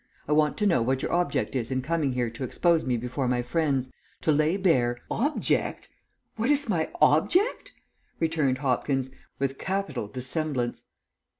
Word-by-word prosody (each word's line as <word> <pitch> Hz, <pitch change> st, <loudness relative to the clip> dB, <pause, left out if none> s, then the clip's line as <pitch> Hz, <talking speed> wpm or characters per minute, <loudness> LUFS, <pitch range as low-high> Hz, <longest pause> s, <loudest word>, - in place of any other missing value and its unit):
I -, -, -3 dB
want 150 Hz, 0 st, +3 dB
to 210 Hz, -, 0 dB
know 170 Hz, -, +3 dB
what 130 Hz, +3 st, 0 dB
your -, -, -2 dB
object 175 Hz, -4 st, 0 dB
is 120 Hz, -3 st, -1 dB
in 130 Hz, -1 st, -1 dB
coming 150 Hz, -2 st, 0 dB
here 120 Hz, -2 st, -1 dB
to 115 Hz, +4 st, -6 dB
expose 165 Hz, +6 st, +2 dB
me 125 Hz, -2 st, +1 dB
before 125 Hz, +3 st, -2 dB
my 125 Hz, 0 st, +1 dB
friends, 135 Hz, -1 st, 0 dB, 0.3 s
to 155 Hz, -, +2 dB
lay 155 Hz, +5 st, +2 dB
bare 125 Hz, -11 st, +2 dB
" -, -, -16 dB, 0.2 s
"Object? 305 Hz, -, -1 dB, 0.5 s
What 225 Hz, +4 st, 0 dB
is 290 Hz, -1 st, +3 dB
my 170 Hz, -7 st, 0 dB
object?" 255 Hz, -, +3 dB, 0.5 s
returned 155 Hz, -5 st, +1 dB
Hopkins, 135 Hz, 0 st, 0 dB, 0.3 s
with 135 Hz, 0 st, -2 dB
capital 195 Hz, -, -2 dB
dissemblance. 130 Hz, +1 st, -3 dB
140 Hz, 165 wpm, -27 LUFS, 125-165 Hz, 0.5 s, want